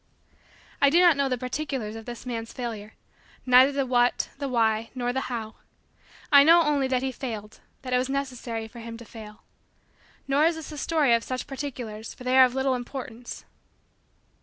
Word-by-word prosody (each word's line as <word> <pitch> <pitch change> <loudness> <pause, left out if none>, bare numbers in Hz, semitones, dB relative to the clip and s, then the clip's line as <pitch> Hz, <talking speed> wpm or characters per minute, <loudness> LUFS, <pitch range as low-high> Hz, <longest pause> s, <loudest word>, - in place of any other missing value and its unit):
I 280 - +6
do 330 +5 +4
not 350 -3 +6
know 280 -1 0
the 255 - 0
particulars 255 -3 -4
of 225 +1 -9
this 240 +1 -8
man's 230 -2 -5
failure 220 -4 -6 0.5
neither 255 +2 +6
the 275 -1 -1
what, 245 -1 +2
the 280 -2 -3
why, 225 -2 +1
nor 245 -1 -1
the 265 0 -3
how. 225 -3 -5 0.7
I 280 -1 +9
know 335 +3 +7
only 290 -3 +1
that 260 -1 0
he 265 - -1
failed 220 -5 -7 0.2
that 255 -1 -4
it 250 - +4
was 255 +1 -2
necessary 250 -5 -3
for 235 +2 -12
him 230 0 -8
to 235 - -12
fail. 215 -1 -12 0.8
Nor 280 +3 +3
is 335 0 +2
this 320 -1 -8
a 300 - -8
story 300 -7 +2
of 230 0 +2
such 255 0 -4
particulars 245 -6 -6
for - - -12
they 255 +1 +1
are 260 0 +9
of 250 0 -3
little 265 0 +1
importance. 245 -1 -7
255 Hz, 190 wpm, -26 LUFS, 230-275 Hz, 0.8 s, I